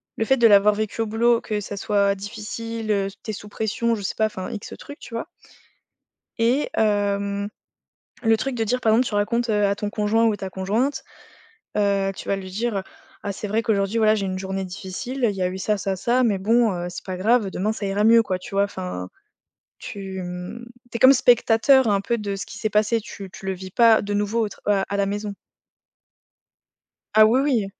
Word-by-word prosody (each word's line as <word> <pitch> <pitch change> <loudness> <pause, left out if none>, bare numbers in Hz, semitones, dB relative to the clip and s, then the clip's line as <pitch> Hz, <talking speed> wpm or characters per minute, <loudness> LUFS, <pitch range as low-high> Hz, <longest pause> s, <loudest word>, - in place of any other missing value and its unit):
le 225 - -1
fait 265 +3 +3
de 235 - +6
l'avoir 205 0 +6
vécu 215 +1 -2
au - - +1
boulot, 230 +2 +2
que 215 -2 -2
ça 205 0 -6
soit 200 0 +1
difficile, 220 +2 -6
heu, 200 -1 +1 0.2
tu 220 - -4
es - - -6
sous 205 +1 -9
pression, 230 +2 -1
je 210 - -6
sais 195 - -3
pas, 220 - +2
enfin, 190 -3 -6
X 205 - -7
trucs, 285 - -10
tu - - -12
vois? 230 - -4 1.1
Et 245 +6 +2
hem, 200 -1 0 0.8
le 225 -1 +4
truc 270 +3 -3
de 225 - 0
dire, 250 +4 -1
par 220 - +3
exemple, 240 +3 +3
tu 210 - -3
racontes, 235 +3 0
heu, 210 -1 +2
à 200 0 +1
ton 205 0 -3
conjoint 215 +2 +1
ou 220 -2 +2
ta 190 -1 -6
conjointe, 210 +10 -1 0.7
heu, 200 -1 +1
tu - - -9
vas 200 - +1
lui 190 -1 -7
dire: 210 0 -2 0.4
«Ah! 200 - -3
C'est 205 +2 -6
vrai 220 +3 0
qu'aujourd'hui, 200 0 0
voilà, 215 -1 +4
j'ai 205 -2 -2
eu - - -2
une 185 - -3
journée 190 0 -3
difficile, 205 +8 -5
il 200 - -6
y 185 - -2
a 180 - +2
eu 185 +1 -6
ça, 210 +2 0
ça, 195 0 -1
ça, 240 +6 +1
mais 205 -4 +2
bon, 225 +3 +3
heu, 175 -1 -4
c'est 175 - -8
pas 185 -1 -4
grave, 215 +1 +2
demain 205 +4 -1
ça 220 - -6
ira 195 +1 0
mieux», 230 +1 +7
quoi, 190 -4 -2
tu 185 - -10
vois? 200 0 +3
Enfin 90 - -5 0.7
tu, 190 -2 -6
mmh, 180 +6 -7 0.3
tu - - -12
es - - -8
comme 260 +1 +8
spectateur 245 +1 +4
un 200 -1 +2
peu 235 +3 -1
de 200 -1 -3
ce 195 - -5
qui 225 - -10
s'est 220 -2 -1
passé, 215 +2 +2
tu 200 -3 -9
tu - - -11
le 190 - 0
vis 185 0 -9
pas 230 +1 +5
de 205 0 -3
nouveau 210 +3 0
au 210 - -4
tra - - -14 0.2
heu, - - -1
à 200 - -2
la 200 - +2
maison. 205 +1 -3 1.8
Ah 215 0 +8
oui, 250 +4 +3
oui! 260 -7 +1
210 Hz, 230 wpm, -23 LUFS, 195-230 Hz, 1.8 s, comme